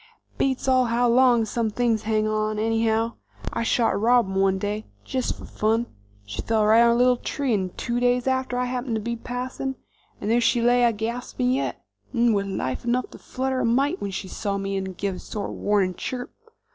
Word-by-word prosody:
"Beats 265 -1 0
all 255 -1 +4
how 240 +1 +2
long 240 -1 +4
some 225 +1 -1
things 230 0 +1
hang 215 0 0
on, 215 0 -1
anyhow. 225 +1 +1 0.4
I - - -1
shot 230 0 +2
a - - -1
robin 230 -2 +3
one 195 0 +2
day, 210 +2 -3 0.2
jest 255 -2 -2
fer - - -10
fun. 225 +2 0 0.4
She 100 +1 -5
fell 220 -1 +1
right 220 +2 +6
under 235 0 +5
a - - +1
little 250 0 +4
tree, 265 -2 -1
'nd 185 -3 -3
two 240 0 -1
days 245 0 +2
after 260 -1 0
I 250 - +1
happened 250 -1 -2
to - - 0
be 235 +2 -3
passing, 255 +3 -4 0.4
and 210 - -2
there 240 +1 +3
she 240 - +3
lay 245 +1 +4
a 235 - +4
gaspin' 235 +3 -2
yet, 265 +2 -2 0.3
'nd 235 -1 +4
with 200 -1 0
life 130 -9 -3
enough 245 +1 -1
to - - -12
flutter 260 0 -2
a - - +1
mite 265 +4 +1
when 200 - -2
she 190 0 -5
saw 200 +1 -3
me, 195 0 -2
'nd 190 -2 -6
give 195 -2 -3
sort 210 -2 -5
of - - -7
a - - -10
warnin' 200 -3 +2
chirp. 245 +5 -5
230 Hz, 215 wpm, -24 LUFS, 210-245 Hz, 0.4 s, right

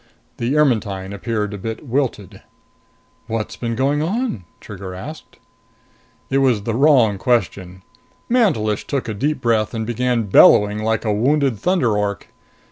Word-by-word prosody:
The 125 +5 -1
Ermetyne 105 -9 0
appeared 105 0 -3
a 100 - -6
bit 110 +8 -6
wilted. 115 -7 -3 0.9
"What's 115 -2 -3
been 115 -1 -4
going 140 +4 +1
on?" 190 - -2
Trigger 95 -2 -9
asked. 150 +12 -10 0.9
It 135 - +2
was 125 -7 +2
the 115 - -2
wrong 125 -6 +3
question. 95 -7 -1 0.4
Mantelish 150 - +1
took 140 -3 -2
a 110 - -3
deep 140 +6 -2
breath 115 -2 0
and 110 -1 -3
began 120 0 0
bellowing 105 +1 +5
like 110 +1 -1
a 105 - +1
wounded 135 +1 +1
thunder 170 - +1
ork. 105 -1 -3
115 Hz, 140 wpm, -19 LUFS, 105-135 Hz, 0.9 s, bellowing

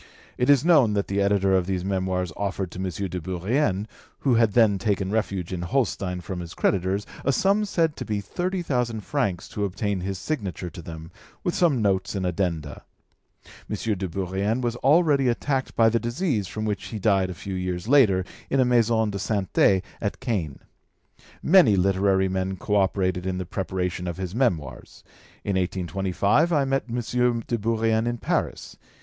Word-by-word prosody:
It 125 - 0
is 140 0 +5
known 145 -11 +5
that 100 -1 0
the 100 +1 0
editor 100 -1 +2
of 90 -1 +1
these 95 -2 -2
Memoirs 95 -3 -1
offered 95 -3 -3
to - - -8
M. 95 0 -2 0.2
de 90 0 -5
Bourrienne, 95 - 0 0.4
who 135 - +2
had 115 -3 +3
then 110 -5 +4
taken 100 -2 -1
refuge 100 -5 -2
in 90 - -3
Holstein 90 -3 -1
from 90 +1 -5
his 85 -1 -8
creditors, 95 +1 0 0.2
a 140 - +2
sum 200 +8 +2
said 165 -6 +1
to - - -4
be 105 -2 -2
thirty 180 - -3
thousand 125 -7 -1
francs 100 - -2
to 105 - -3
obtain 100 0 -1
his 95 +1 -3
signature 95 - -4
to 90 - -9
them, 80 0 -9 0.3
with 175 - 0
some 150 -11 +2
notes 100 0 0
and 95 -2 -1
addenda. 85 -4 -2 0.9
M. - - -1 0.2
de 95 0 -3
Bourrienne 95 +6 -1
was 120 -2 -1
already 145 0 +3
attacked 130 +2 -1
by 115 - +5
the 115 +1 +2
disease 120 - -1
from 110 +3 -4
which 105 -2 -2
he 110 - -5
died 95 -3 +2
a 90 - -6
few 95 +2 -6
years 90 0 -3
latter 110 -9 +4 0.2
in 135 - +1
a 130 - +5
maison 115 -3 +2
de 100 - -4
santé 100 -1 +2 0.2
at 100 - -2
Caen. 100 - -2 0.9
Many 170 - +6
literary 95 0 +2
men 95 0 -2
co 105 - -1
operated 95 -2 +1
in 95 -1 -1
the 95 - -3
preparation 90 -1 -3
of 85 - -4
his 95 -1 -4
Memoirs. 85 - -2 0.4
In 100 - -1
1825 95 - +1
I 145 -4 +3
met 135 0 0
M. 115 - -3 0.5
de 120 - -1
Bourrienne 115 +1 +1
in 120 0 -1
Paris. - - -2
100 Hz, 180 wpm, -25 LUFS, 95-120 Hz, 0.9 s, Many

